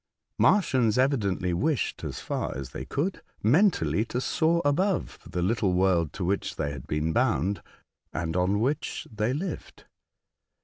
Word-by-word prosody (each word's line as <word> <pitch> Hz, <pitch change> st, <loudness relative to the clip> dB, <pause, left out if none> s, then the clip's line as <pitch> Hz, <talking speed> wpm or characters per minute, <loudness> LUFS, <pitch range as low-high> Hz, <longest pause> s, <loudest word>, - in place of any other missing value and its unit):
The -, -, -4 dB
Martians 130 Hz, -, +4 dB
evidently 100 Hz, -9 st, +1 dB
wished, 145 Hz, -, 0 dB
as -, -, -4 dB
far -, -, -3 dB
as 70 Hz, -2 st, -6 dB
they -, -, -6 dB
could, 175 Hz, +7 st, -2 dB, 0.2 s
mentally 110 Hz, -, +3 dB
to 125 Hz, -, -3 dB
soar 165 Hz, +5 st, +2 dB
above 180 Hz, +6 st, +1 dB
the 90 Hz, -, -2 dB
little 100 Hz, -1 st, +1 dB
world 90 Hz, -4 st, +2 dB
to 90 Hz, -, -3 dB
which 100 Hz, +2 st, -1 dB
they 70 Hz, -, -2 dB
had 70 Hz, -, -8 dB
been 75 Hz, +2 st, -1 dB
bound, 95 Hz, +9 st, +1 dB, 0.5 s
and 80 Hz, -1 st, -3 dB
on 90 Hz, +3 st, +2 dB
which 140 Hz, +6 st, -1 dB
they 110 Hz, +2 st, 0 dB
lived. 160 Hz, +5 st, -5 dB
105 Hz, 150 wpm, -27 LUFS, 90-145 Hz, 0.5 s, Martians